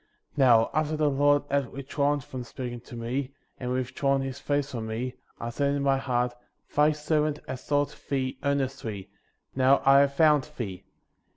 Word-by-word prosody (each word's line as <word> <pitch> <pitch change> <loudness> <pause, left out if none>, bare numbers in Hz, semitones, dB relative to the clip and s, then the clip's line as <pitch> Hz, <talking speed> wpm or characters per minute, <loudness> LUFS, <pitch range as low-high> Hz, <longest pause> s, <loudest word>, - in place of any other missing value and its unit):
12. - - -34
Xow, 120 -5 +5
after 155 0 0
the 150 -1 +2
Lord 145 +1 +3
had 140 -3 0
withdrawn"' 140 +1 -1
from 130 0 -7
speaking 120 0 -6
to 120 0 -12
me, 130 +4 -3 0.2
and 125 -1 -3
withdrawn 135 +2 0
his 135 0 -5
face 145 -1 -1
from 115 -3 -4
me, 120 +3 -3 0.3
I 120 - -4
said 140 +3 0
in 140 - -1
my 135 -1 +3
heart: 125 -2 0 0.4
Thy 150 +1 +5
servant 150 0 0
has 130 -1 -6
sought 145 0 0
thee 130 -2 -1
ear 140 0 +2
nestly; 125 -8 -4 0.5
now 130 +1 +5
I 135 0 +7
have 140 0 +3
found 150 -3 +4
thee; 100 -7 -4
13. - - -27
135 Hz, 185 wpm, -27 LUFS, 125-145 Hz, 0.5 s, I